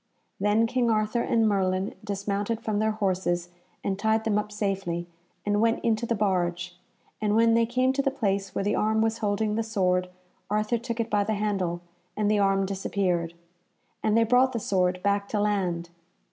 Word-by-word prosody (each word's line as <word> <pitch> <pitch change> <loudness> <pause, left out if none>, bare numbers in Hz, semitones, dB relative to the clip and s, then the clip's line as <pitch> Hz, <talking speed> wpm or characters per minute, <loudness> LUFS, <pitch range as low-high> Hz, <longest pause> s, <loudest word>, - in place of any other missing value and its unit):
Then 210 +3 +3
King 245 0 +1
Arthur 215 +1 +1
and 225 -2 +2
Merlin 190 -1 0
dismounted 205 +2 -2
from 215 -2 -1
their 220 0 +2
horses 180 -4 -1 0.3
and 195 -1 -2
tied 220 +1 +2
them 215 -2 +1
up 210 0 -5
safely, 195 -5 -2 0.4
and 205 0 +1
went 230 0 +2
into 230 0 +1
the 230 - +1
barge, 180 -3 -1 0.5
and 210 -1 +1
when 230 0 +5
they 230 0 +3
came 255 +2 +2
to 275 - +1
the 275 - +1
place 200 -7 -2
where - - 0
the 205 - +1
arm 220 +1 +2
was 225 0 0
holding 210 0 0
the 225 - 0
sword 185 -5 0 0.4
Arthur 215 +3 0
took 235 0 -5
it 230 0 -2
by 205 -1 +3
the 215 +1 -1
handle, 195 -5 -1 0.4
and 210 0 +2
the 210 - +3
arm 195 -1 +2
disappeared. 185 -3 -1 0.7
And 215 +1 +2
they 230 - +5
brought 250 +3 +3
the 230 - -1
sword 180 -3 0
back 200 0 +1
to 210 - -1
land. 180 -5 -1
210 Hz, 190 wpm, -26 LUFS, 195-225 Hz, 0.7 s, when